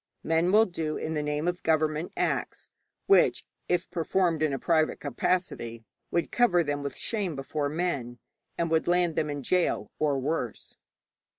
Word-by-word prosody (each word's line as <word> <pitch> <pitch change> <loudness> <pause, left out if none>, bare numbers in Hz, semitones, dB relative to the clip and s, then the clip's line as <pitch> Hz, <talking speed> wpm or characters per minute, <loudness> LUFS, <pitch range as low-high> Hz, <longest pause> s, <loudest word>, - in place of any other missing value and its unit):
Men 165 +3 +2
will 215 +2 +6
do 160 -5 -3
in 160 - -3
the 150 - 0
name 150 +2 -1
of 175 0 -1
government 155 +1 +1
acts - - -1 0.3
which, 395 - +4 0.2
if 175 0 +1
performed 170 -1 +1
in 155 -2 +2
a 135 - -1
private 155 +1 +1
capacity, 120 -5 -2 0.3
would 170 -2 -1
cover 185 -9 +4
them 145 -1 -2
with 140 -2 -5
shame 200 -8 -2
before 145 +2 -2
men, 145 -7 -2 0.4
and 165 -1 -1
would 160 -1 +2
land 175 -2 +2
them 150 - 0
in 145 - -3
a - - -5
gaol 180 +6 0
or 145 -2 +2
worse. 135 -4 -3
160 Hz, 170 wpm, -28 LUFS, 145-175 Hz, 0.4 s, will